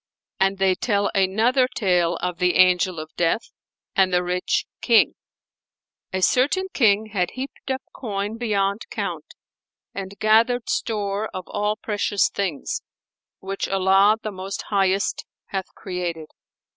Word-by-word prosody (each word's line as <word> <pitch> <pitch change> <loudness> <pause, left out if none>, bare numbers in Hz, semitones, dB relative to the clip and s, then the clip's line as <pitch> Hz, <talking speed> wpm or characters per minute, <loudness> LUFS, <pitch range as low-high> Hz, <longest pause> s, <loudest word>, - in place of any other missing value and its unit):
And 195 +1 +2
they 190 -1 +3
tell 200 0 0
another 220 +7 +3
tale 180 -7 +1
of 180 -1 -2
THE 180 -1 +2
ANGEL 180 -1 +4
OF 155 0 -8
DEATH 175 +6 0 0.4
AND 190 -2 +4
THE 180 0 +2
RICH 180 +1 0 0.2
KING. 230 -3 +4 1.0
A 185 0 -1
certain 290 - +3
King 215 -3 +3
had 180 -3 +1
heaped 270 +1 -7
up 265 0 -2
coin 210 -3 -4
beyond 200 -2 0
count 180 -8 -5 0.6
and 195 0 -6
gathered 230 +3 +3
store 210 -1 -1
of 185 - -4
all 210 +1 -1
precious 205 -2 0
things, 185 -8 -3 0.6
which 195 +1 -3
Allah 195 +2 +4
the 215 - -3
Most 190 +1 -5
Highest 195 0 +1 0.3
hath 190 -2 -3
created. 175 -4 -4
195 Hz, 130 wpm, -23 LUFS, 185-215 Hz, 1.0 s, ANGEL